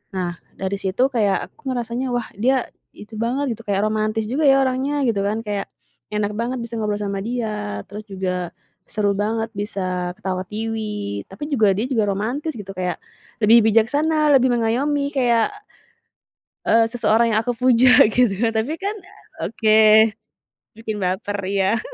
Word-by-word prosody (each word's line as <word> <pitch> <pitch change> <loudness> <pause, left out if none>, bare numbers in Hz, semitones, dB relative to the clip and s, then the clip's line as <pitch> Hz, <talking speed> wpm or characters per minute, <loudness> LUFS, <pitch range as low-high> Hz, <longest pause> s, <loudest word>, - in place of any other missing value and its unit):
Nah, 180 -2 -3 0.2
dari 190 +1 -3
situ 195 +7 +1
kayak 210 -6 0
aku 280 -3 -6
ngerasanya, 240 +2 -3
wah, 240 -2 -1
dia 260 +2 +2 0.3
itu 215 +2 -11
banget 255 +4 -1
gitu, 230 - -13
kayak 200 0 +1
romantis 215 +1 -1
juga 280 +6 0
ya 270 0 +5
orangnya, 270 +2 0
gitu 220 -4 +1
kan, 220 +2 -2
kayak 205 -2 -3 0.5
enak 210 0 0
banget 235 +3 -2
bisa 235 0 -6
ngobrol 210 -1 -1
sama 200 -1 -3
dia 210 - -3
terus 210 +2 -7
juga 180 -2 -3 0.4
seru 205 -1 +1
banget 220 +3 -1
bisa 185 -3 -3
ketawa-tiwi, 210 - -4
tapi 195 +8 -9
juga 215 -8 +3
dia 215 - 0
juga 220 -5 +1
romantis 245 +11 -2
gitu, 195 -1 -7
kayak 180 -1 -2 0.5
lebih 225 +3 +7
bijaksana, 295 +8 +3
lebih 260 -1 +4
mengayomi 270 +5 0
kayak, 240 - +2 1.2
eee, 225 0 +5
seseorang 230 -1 +2
yang - - +4
aku 245 - 0
puja, 250 0 +5 0.2
gitu. 245 -3 +3 0.2
Tapi 225 +7 -1
kan 405 +2 -2 0.5
oke, 220 0 +5 0.7
bikin 220 -1 -5
baper, 195 +3 -2
iya. 195 +2 +1
220 Hz, 150 wpm, -21 LUFS, 200-245 Hz, 1.2 s, lebih